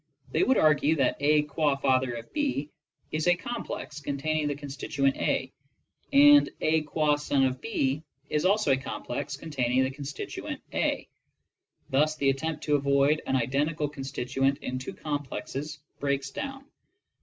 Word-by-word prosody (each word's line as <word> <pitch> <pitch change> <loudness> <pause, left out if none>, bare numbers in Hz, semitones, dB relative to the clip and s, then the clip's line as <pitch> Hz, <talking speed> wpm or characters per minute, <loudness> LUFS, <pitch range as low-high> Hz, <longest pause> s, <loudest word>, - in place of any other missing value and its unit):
They - - +1
would 265 - +4
argue 155 0 +4
that 135 -4 +1
''A 150 +1 +3
qtid 145 -1 0
father 130 -2 +2
of 115 - -9
B" 270 - -1 0.4
is 155 +2 -1
a 175 - +6
complex 175 -7 -5
containing 150 +2 -1
the 145 - -1
constituent 140 -1 -1
A, 130 0 -1 0.6
and 290 +1 +7
^'A 155 -1 +1
gua 150 -1 +2
son 140 -2 +2
of 130 0 -1
C 145 -10 0 0.3
is 150 +1 0
also 195 -4 +3
a 130 - +4
complex 140 +2 -5
containing 130 -5 0
the 130 - -1
constituent 140 +1 -6
A. - - 0 0.8
Thus 150 +3 +3
the 140 -3 +2
attempt 155 +3 -3
to 150 -1 +3
avoid 140 +2 +3
an 135 - +1
identical 145 +5 0
constituent 135 -1 -1
in 130 0 -3
two 130 - -6
complexes 145 0 -4 0.2
breaks 140 -1 -1
down. 275 - -6
145 Hz, 150 wpm, -28 LUFS, 135-155 Hz, 0.8 s, and